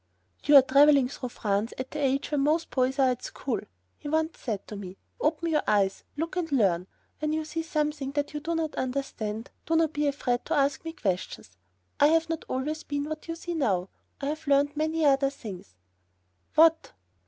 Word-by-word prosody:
"You 295 - +6
are 275 - +11
traveling 280 -1 +5
through 255 -2 -6
France 210 -1 -1
at 260 0 -5
the 300 - -4
age 275 +2 0
when 295 -2 +1
most 310 +4 +1
boys 260 +1 +1
are 265 -2 +4
at 250 - -4
school," 265 -4 -3 0.4
he 290 - -6
once 315 +1 0
said 215 -6 -4
to 210 - -7
me; 195 -2 -8 0.2
"open 320 +2 0
your 305 -2 +2
eyes, 195 -2 +1
look 330 +3 -3
and 340 -4 -2
learn. 190 -9 +2 0.3
When 305 0 -1
you 315 0 -1
see 325 +1 -3
something 300 -3 -2
that 290 0 -2
you 300 - -3
do 330 +3 -2
not 320 -2 -1
understand, 250 -4 -3 0.2
do 325 - +2
not 320 -1 +2
be 295 0 0
afraid 255 -3 0
to 325 - 0
ask 275 -1 +1
me 325 - -4
questions. 185 - -3 0.5
I 290 - +7
have 325 +1 +2
not 325 -1 -3
always 300 +5 -2
been 285 -2 -3
what 310 +2 -6
you 330 - -3
see 345 +1 -5
me 325 - -2
now. 190 -8 +1 0.3
I 275 - -4
have 310 0 -5
learnt 285 +1 +3
many 315 +1 0
other 275 -1 +4
things." 190 - -10 0.8
"What?" 325 +1 +5
285 Hz, 205 wpm, -27 LUFS, 255-315 Hz, 0.8 s, are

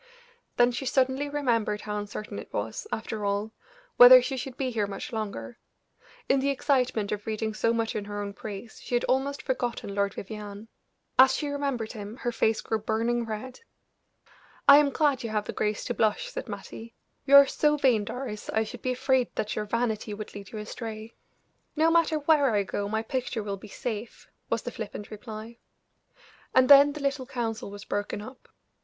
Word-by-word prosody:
Then 245 0 +5
she 255 +2 -4
suddenly 265 +2 +1
remembered 230 -7 0
how 210 0 -3
uncertain 205 +1 -6
it - - -11
was, - - -4
after 220 -1 -4
all, 200 +2 -1 0.5
whether 250 +1 +11
she 265 +2 -3
should 255 0 -6
be 260 -2 -1
here 215 -3 0
much 200 +3 -7
longer; 220 +2 -5 0.7
in 270 - +3
the 275 +1 +1
excitement 255 -6 +1
of 210 0 -4
reading 220 0 -2
so 230 +2 +1
much 230 -1 -1
in 205 - -3
her 205 0 -5
own 200 -1 -4
praise, 210 +2 -8
she 245 - -3
had 240 - +1
almost 275 +2 0
forgotten 245 -6 -2
Lord 200 0 0
Vivianne. 210 +1 -8 0.5
As 265 0 +8
she 295 - -2
remembered 275 -6 -2
him 210 0 -8
her 240 -2 -2
face 220 -1 +1
grew 220 - -1
burning 230 +2 -1
red. 225 +4 -6 1.1
"I 280 - +11
am 295 -1 +4
glad 285 -2 +1
you 230 - -4
have 210 -1 -1
the - - -5
grace 210 0 -1
to 240 - -1
blush," 235 - +1
said - - -6
Mattie. 230 +1 -8 0.3
"You 280 - +7
are 280 0 +11
so 300 +2 +1
vain, 250 -7 +3
Doris, 225 -1 -6
I 220 - +1
should 230 +2 -9
be 255 - 0
afraid 260 0 +2
that 210 - -2
your 210 - -2
vanity 220 -1 -1
would 215 0 -8
lead 200 -2 -9
you 220 - -6
astray." 220 +1 -7 0.6
"No 320 +1 +3
matter 330 -2 +3
where 290 -5 +3
I 200 - +2
go 200 +1 -3
my 220 +1 -1
picture 245 -2 -3
will 200 -1 -3
be 195 +2 -12
safe," 220 +1 -6 0.2
was - - -1
the - - -4
flippant 210 - -7
reply. 220 +2 -8 1.0
And 255 0 +5
then 285 0 +9
the 300 -1 -7
little 275 -2 -1
council 230 -2 -3
was 205 0 -9
broken 205 0 -3
up. 255 +5 -11
230 Hz, 190 wpm, -27 LUFS, 210-265 Hz, 1.1 s, whether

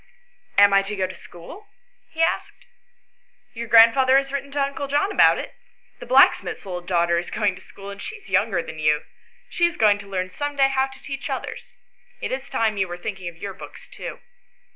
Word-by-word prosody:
" 485 0 -36
Am 205 0 +7
I 195 - +6
to 200 +2 -5
go 190 -2 0
to 185 - -7
school? 325 - -13 0.2
" - - -41
he 325 - +2
asked. 330 - -2 0.9
"Your 235 0 -6
grandfather 245 +4 +6
has 275 0 0
written 280 0 -3
to 290 - -2
uncle 280 0 -3
John 290 +8 +1
about - - +5
it. - - -6 0.5
The - - -10
blacksmith's - - +4
little 180 -2 -5
daughter 170 -1 +1
is 175 - -6
going 210 -3 0
to 185 - -13
school, 200 +1 -11
and 200 0 -10
she - - -6
is 415 -3 -15
younger 185 -6 +1
than 155 - -9
you. 150 -1 +2 0.4
She 345 - +2
is 345 - -7
going 210 -2 +4
to 200 - -11
learn 185 -1 -3
some 290 +6 -4
day 270 -1 +4
how 265 0 +1
to 265 0 -16
teach 275 -1 -6
others. - - -6 0.4
It - - -4
is 265 +1 -4
time 220 -2 0
you 190 -1 0
were 175 0 -6
thinking 190 0 -6
of 170 - -16
your 200 +3 -6
books - - -12
too." - - -8
215 Hz, 220 wpm, -23 LUFS, 185-275 Hz, 0.9 s, Am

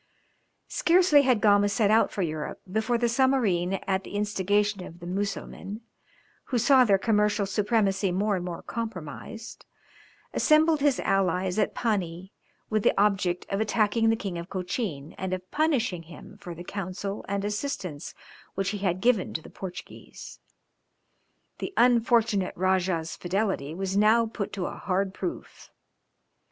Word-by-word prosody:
Scarcely 345 -4 +4
had 255 -5 +2
Gama 205 -1 +4
set 205 0 +2
out 220 - +4
for 195 - -2
Europe, 155 -2 -4
before 220 +4 +1
the 240 0 +1
Zamorin 230 -8 +2
at 190 0 0
the - - -9
instigation 205 -1 0
of 170 0 -11
the 175 - -10
Musselmen, 200 +2 -4 0.6
who 250 - -1
saw 255 +3 +6
their 200 -5 +4
commercial 210 0 +1
supremacy 200 -1 +1
more 200 +3 +1
and 180 - -3
more 175 -2 -6
compromised, 220 0 -7 0.7
assembled 310 0 +4
his 285 -3 +3
allies 185 0 +1
at - - 0
Pani 190 -5 -2 0.3
with 215 -1 0
the - - +2
object 190 -4 +1
of 195 +2 0
attacking 220 +1 +2
the 225 - +3
King 195 -6 -4
of 170 +2 -8
Cochin 180 - -4
and 190 0 -2
of 185 0 -6
punishing 260 - +1
him 165 +4 -13
for 175 -4 -8
the 175 - -8
counsel 195 +1 -5
and 200 0 -1
assistance 205 - -4 0.4
which 195 0 -1
he 205 0 -3
had 185 -2 -1
given 230 -5 +2
to 160 - -2
the - - -12
Portuguese. 185 -2 -9 1.2
The 390 - -5
unfortunate 230 -5 +3
Rajah's 185 -3 0
fidelity 185 -5 -2
was 190 +1 -3
now 215 +3 +4
put 220 -2 -5
to 190 -3 -3
a - - -3
hard 190 0 -1
proof. 335 - -6
200 Hz, 150 wpm, -27 LUFS, 185-225 Hz, 1.2 s, saw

